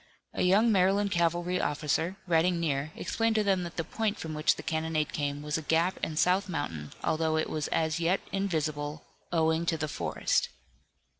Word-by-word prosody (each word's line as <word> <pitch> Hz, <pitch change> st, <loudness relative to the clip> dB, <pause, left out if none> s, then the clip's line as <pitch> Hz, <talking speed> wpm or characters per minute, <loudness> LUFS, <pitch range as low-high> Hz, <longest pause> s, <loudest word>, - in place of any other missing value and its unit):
A -, -, -2 dB
young 205 Hz, +6 st, +4 dB
Maryland 200 Hz, +1 st, +3 dB
cavalry 175 Hz, +1 st, +1 dB
officer, 155 Hz, +5 st, -1 dB
riding 170 Hz, 0 st, +2 dB
near, 150 Hz, -2 st, -1 dB
explained 225 Hz, -1 st, 0 dB
to 215 Hz, -, +3 dB
them 195 Hz, -2 st, +2 dB
that 170 Hz, -1 st, -6 dB
the 165 Hz, -, 0 dB
point 215 Hz, +5 st, -2 dB
from 160 Hz, -1 st, -5 dB
which 155 Hz, 0 st, +2 dB
the -, -, -8 dB
cannonade 160 Hz, -1 st, -1 dB
came 145 Hz, -1 st, -2 dB
was 150 Hz, +1 st, -1 dB
a -, -, -6 dB
gap 165 Hz, +4 st, +1 dB
in 155 Hz, -, -3 dB
South 185 Hz, +4 st, +2 dB
Mountain, 85 Hz, -, -4 dB
although 160 Hz, 0 st, +1 dB
it 155 Hz, -, -1 dB
was 155 Hz, -2 st, -2 dB
as 160 Hz, 0 st, 0 dB
yet 175 Hz, +3 st, +2 dB
invisible, 155 Hz, -6 st, -2 dB, 0.3 s
owing 160 Hz, -1 st, +2 dB
to 165 Hz, -, +1 dB
the 155 Hz, 0 st, -2 dB
forest. 140 Hz, -, 0 dB
165 Hz, 180 wpm, -29 LUFS, 155-185 Hz, 0.3 s, young